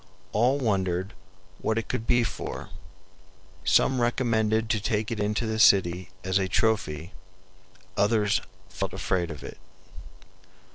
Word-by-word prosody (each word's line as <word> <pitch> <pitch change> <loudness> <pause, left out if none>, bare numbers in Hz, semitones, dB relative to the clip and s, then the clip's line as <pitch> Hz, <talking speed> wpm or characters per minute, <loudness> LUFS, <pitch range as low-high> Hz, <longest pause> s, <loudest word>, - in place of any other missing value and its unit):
All 125 +6 +3
wondered 95 -6 -1 0.5
what 110 - -1
it 115 - -2
could 115 - -3
be 120 0 +4
for. - - -5 0.9
Some 130 -2 +3
recommended 110 -2 +1
to 110 - +1
take 110 +1 -1
it 115 - -3
into 105 +2 0
the 110 0 -2
city 90 -4 +4
as 95 +1 +1
a 95 - 0
trophy; 95 -5 0 0.8
others 105 -1 +2 0.3
felt - - -4
afraid 90 -2 -1
of 75 - -8
it. - - -9
105 Hz, 130 wpm, -27 LUFS, 95-115 Hz, 0.9 s, be